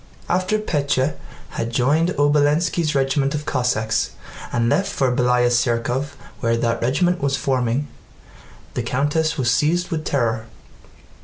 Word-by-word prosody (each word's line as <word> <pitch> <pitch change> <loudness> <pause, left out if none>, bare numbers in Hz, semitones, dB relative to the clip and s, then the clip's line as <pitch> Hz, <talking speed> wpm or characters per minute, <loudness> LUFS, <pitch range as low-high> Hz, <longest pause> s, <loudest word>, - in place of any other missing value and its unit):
After 185 +4 +1
Pétya 145 -8 0 0.3
had 115 - -3
joined 145 +8 +2
Obolénski's 150 +2 +2
regiment 135 +1 +1
of 150 0 -4
Cossacks 125 -6 0 0.4
and 115 -1 +1
left 195 +11 +1
for 130 -3 0
Bélaya 125 -1 +3
Tsérkov 120 +3 0 0.3
where 115 -1 +1
that 115 0 -1
regiment 175 +9 +1
was 135 -1 +1
forming, 130 +1 0 0.9
the - - -2
countess 145 +6 0
was 125 -3 +1
seized 175 +8 +1
with 160 -2 -2
terror. 115 -6 -1
135 Hz, 130 wpm, -21 LUFS, 120-150 Hz, 0.9 s, Bélaya